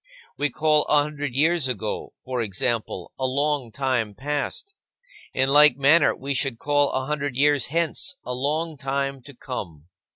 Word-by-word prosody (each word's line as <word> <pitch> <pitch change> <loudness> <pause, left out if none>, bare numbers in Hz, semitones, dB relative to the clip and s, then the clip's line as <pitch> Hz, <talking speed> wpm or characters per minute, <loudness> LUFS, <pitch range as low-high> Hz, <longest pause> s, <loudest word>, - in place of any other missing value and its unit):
We 145 - 0
call 155 +2 +3
a 145 -1 +4
hundred 145 -3 -5
years 160 0 +2
ago, 110 -4 -4
for 130 -1 -2
example, 110 -2 -2
a 130 - +1
long 140 -2 -1
time 125 -4 -1
past. 145 - -3 0.6
In 130 - +1
like 145 -1 +6
manner, 145 +5 +4
we 140 +2 -3
should 135 -3 0
call 145 +2 +2
a 130 - -1
hundred 145 -2 -2
years 145 -1 +3
hence 170 - -1
a 125 - -3
long 150 +5 -2
time 135 0 -2
to 140 +1 -13
come. 85 - -7
140 Hz, 160 wpm, -24 LUFS, 125-150 Hz, 0.6 s, like